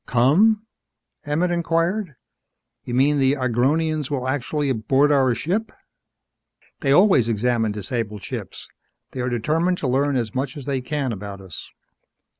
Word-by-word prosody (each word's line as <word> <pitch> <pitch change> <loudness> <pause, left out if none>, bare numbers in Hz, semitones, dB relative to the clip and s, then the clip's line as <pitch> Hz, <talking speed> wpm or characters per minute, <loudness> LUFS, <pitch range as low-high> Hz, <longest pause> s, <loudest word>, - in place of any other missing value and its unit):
"Come?" 195 - +3 0.6
Emmett 165 +5 +1
inquired. 170 +1 0 0.7
"You 120 - -3
mean 145 +3 +3
that - - +1
the 135 +1 +4
Agronians 140 +4 0
will 130 -3 -2
actually 145 +2 -1
board 135 +5 +2
our 130 -4 +3
ship?" 185 - -2 1.1
"They 135 - 0
always 145 - +5
examine 115 0 +1
disabled 105 0 -4
ships. - - -7 0.4
They 130 - -5
are 125 - -1
determined 160 +10 0
to 140 - -3
learn 140 +2 +1
as 115 -4 -2
much 130 +2 -3
as 140 - -8
they 135 -2 -1
can 135 0 -2
about 100 -1 -7
us." 95 -4 -10
135 Hz, 145 wpm, -22 LUFS, 120-155 Hz, 1.1 s, always